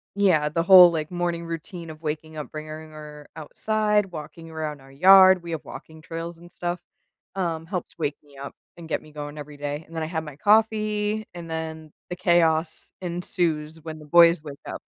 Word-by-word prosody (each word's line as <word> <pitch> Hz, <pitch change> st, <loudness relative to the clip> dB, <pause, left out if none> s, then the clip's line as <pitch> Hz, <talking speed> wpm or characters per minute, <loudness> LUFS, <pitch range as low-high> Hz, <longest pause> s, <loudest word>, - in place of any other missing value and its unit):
yeah, 180 Hz, -7 st, +3 dB
the 165 Hz, +2 st, 0 dB
whole, 180 Hz, 0 st, +9 dB
like, 155 Hz, -2 st, -3 dB
morning 175 Hz, -1 st, -2 dB
routine 165 Hz, +1 st, -7 dB
of 155 Hz, +1 st, -11 dB
waking 155 Hz, +1 st, -4 dB
up, 150 Hz, -, -6 dB
bringing 155 Hz, +1 st, -8 dB
her 150 Hz, -1 st, -11 dB
outside, 210 Hz, +4 st, 0 dB
walking 160 Hz, +1 st, -9 dB
around 155 Hz, -2 st, -4 dB
our 135 Hz, 0 st, -17 dB
yard- 190 Hz, +5 st, +7 dB
we 170 Hz, -, -8 dB
have 160 Hz, -, -5 dB
walking 160 Hz, 0 st, -11 dB
trails 165 Hz, +1 st, -6 dB
and 175 Hz, +1 st, -15 dB
stuff- 175 Hz, 0 st, -3 dB, 0.6 s
um, 165 Hz, -4 st, -2 dB
helps 180 Hz, -1 st, -5 dB
wake 150 Hz, -2 st, -2 dB
me 140 Hz, -1 st, -19 dB
up, 140 Hz, +1 st, -8 dB, 0.2 s
and 170 Hz, -2 st, -10 dB
get -, -, -2 dB
me 155 Hz, -, -16 dB
going 150 Hz, 0 st, -7 dB
every 145 Hz, 0 st, -9 dB
day, 145 Hz, +1 st, -4 dB
and 165 Hz, -, -13 dB
then 160 Hz, -, -2 dB
I -, -, -1 dB
have 160 Hz, 0 st, -3 dB
my 150 Hz, -3 st, -9 dB
coffee, 215 Hz, +1 st, +2 dB
and 170 Hz, -1 st, -9 dB
then, 160 Hz, -1 st, -5 dB, 0.2 s
the -, -, -2 dB
chaos 170 Hz, -2 st, +1 dB
ensues 170 Hz, -3 st, -2 dB
when 155 Hz, 0 st, -7 dB
the 150 Hz, -, -12 dB
boys 170 Hz, +1 st, +6 dB
wake 145 Hz, -2 st, -9 dB
up, -, -, -6 dB
165 Hz, 195 wpm, -24 LUFS, 155-175 Hz, 0.6 s, whole